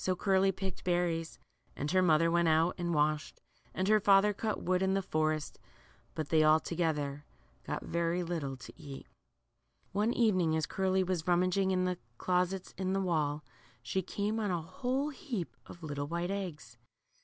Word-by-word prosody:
So 185 - +1
Curly 195 0 +3
picked 190 -1 -5
berries, 175 -2 0 0.4
and 145 +2 -3
her 185 0 +4
mother 165 -1 +4
went 170 0 +3
out 160 +2 +3
and 175 0 -1
washed, 150 -1 0 0.3
and 185 - -1
her 215 0 +5
father 200 +1 +5
cut 215 +1 -2
wood 180 0 +1
in 190 0 +2
the 195 - 0
forest; 155 -2 -1 0.6
hut 155 -2 -3
they 160 -1 +4
all 155 +1 +6
together 150 -4 -2 0.4
got - - -3
very 170 +1 0
little 155 -6 -3
to 125 - -11
eat. 140 -2 -9 0.9
One 210 +4 +1
evening 185 -10 +2
as 160 -1 +1
Curly 190 0 +1
was 180 -3 -2
rummaging 185 +2 +2
in 185 -1 +1
the 180 -1 -1 0.2
closets 180 +1 0
in 190 0 0
the 195 - +1
wall, 155 -5 0 0.4
she 190 +11 -1
came 205 +4 -2
on 210 -2 -1
a 175 -3 -1
whole 255 - -2
heap 260 - -5
of 170 - -12
little 145 -2 -3
white 170 +3 -2
eggs. 155 - -6
175 Hz, 175 wpm, -32 LUFS, 160-190 Hz, 0.9 s, all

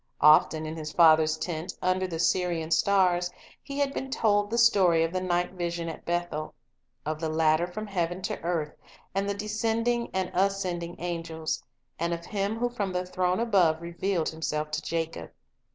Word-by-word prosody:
Often 155 +1 +6
in 155 +1 -5
his 155 -2 -5
father's 160 -1 +5
tent, 170 +1 -4
under 185 +1 +1
the 165 -3 -4
Syrian 170 -1 0
stars, 180 -1 +3 0.3
he 280 -1 -7
had 280 -1 +1
been 265 - -4
told 205 -5 +2
the 235 - -1
story 190 -8 +5
of 165 +1 -2
the 185 - -1
night 175 -1 0
vision 170 -2 -3
at 160 - -9
Bethel, 175 -3 -2 0.5
of 155 0 -2
the 160 -1 -2
ladder 155 +1 +2
from 215 +4 -6
heaven 175 -3 -2
to - - -3
earth, 165 -3 -2 0.4
and 195 +1 -1
the 200 - -1
descending 225 +3 -1
and 185 -1 -2
ascending 180 -3 -1
angels, 165 -2 -3 0.4
and 170 +1 0
of 170 0 -10
Him 200 +2 -2
who 245 +1 +1
from 205 -6 -3
the 180 0 -1
throne 180 +1 0
above 190 -9 +3
revealed 170 0 -1
Himself 155 -1 -3
to 150 +1 -2
Jacob. 165 - -3
175 Hz, 175 wpm, -27 LUFS, 160-195 Hz, 0.5 s, Often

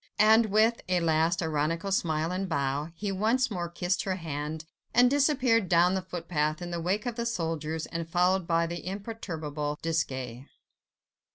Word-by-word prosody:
And, 220 +1 +6
with 220 +3 +3
a 180 -1 +3
last 165 +1 +2
ironical 160 +5 -1
smile 160 -3 0
and 185 +1 -2
bow, 140 0 -1
he 200 +3 -3
once 225 +6 +1
more 175 -3 -3
kissed 175 +2 -1
her 190 -1 -1
hand, 155 -2 -5 0.3
and 245 +1 +6
disappeared 260 - +3
down 175 +2 +4
the 190 - 0
footpath 165 -4 -2
in 175 -1 -6
the 170 -1 -3
wake 195 +7 -1
of 240 -1 -3
the 235 - -2
soldiers, 160 -6 -2
and 165 -1 -5
followed 180 +1 +2
by 170 0 +2
the 170 +1 -5
imperturbable 160 -8 -4
Desgas. 130 -6 -2
175 Hz, 165 wpm, -28 LUFS, 160-200 Hz, 0.3 s, And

